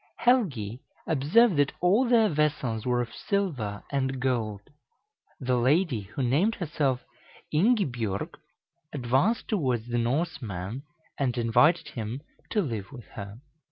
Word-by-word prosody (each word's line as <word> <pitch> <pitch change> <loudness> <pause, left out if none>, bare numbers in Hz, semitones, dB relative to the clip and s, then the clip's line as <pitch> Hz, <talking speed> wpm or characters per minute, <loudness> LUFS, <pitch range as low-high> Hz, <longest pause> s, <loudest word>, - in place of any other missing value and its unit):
Helgi 135 - +1 0.3
observed 165 - +4
that 145 -1 +2
all 210 +8 +3
their 230 -3 +5
vessels 145 - 0
were 125 0 +2
of 115 - -10
silver 140 - -2
and 135 -1 -1
gold. 115 -6 -1 0.8
The 125 -1 +1
lady, 135 - +2
who 135 - -1
named 160 - +2
herself 145 -7 -1 0.5
Ingibjorg, 145 - +1 0.6
advanced 135 - +1
towards 125 - -1
the 120 - +1
Norseman, 120 - -2 0.4
and 130 -3 0
invited 120 +8 +3
him 115 +3 -5 0.3
to 210 - +1
live 110 - -4
with 120 -5 -10
her. 100 +3 -9
130 Hz, 125 wpm, -27 LUFS, 120-170 Hz, 0.8 s, their